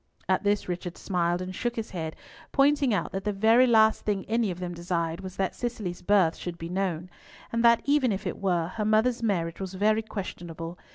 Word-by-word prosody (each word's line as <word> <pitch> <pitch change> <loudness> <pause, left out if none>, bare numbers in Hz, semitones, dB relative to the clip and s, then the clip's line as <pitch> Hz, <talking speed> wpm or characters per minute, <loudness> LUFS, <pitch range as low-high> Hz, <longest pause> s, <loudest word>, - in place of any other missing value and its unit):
At - - +2
this 205 0 +1
Richard 175 -1 -4
smiled 175 -1 0
and 185 0 -6
shook 240 +5 -2
his 225 -1 -4
head, 160 -3 -4 0.4
pointing 280 -1 +3
out 205 - 0
that 195 0 -4
the 210 - 0
very 225 +5 +5
last 220 -2 +4
thing 200 -3 -1
any 230 -1 +1
of 180 -1 -5
them 180 -1 -4
desired 170 0 -2
was 185 -1 -8
that 190 -1 -1
Cicely's 215 -7 -4
birth 185 -4 +3
should 175 -1 -6
be 165 0 -6
known; 180 -2 -2 0.4
and 230 0 0
that 235 -1 +5
even 280 -4 +3
if 200 +1 -3
it 180 - -3
were, 175 -4 0
her 210 +3 -3
mother's 220 +3 +2
marriage 170 -7 -1
was 190 0 -5
very 215 +3 +2
questionable. 175 -5 -7
195 Hz, 210 wpm, -27 LUFS, 175-220 Hz, 0.4 s, very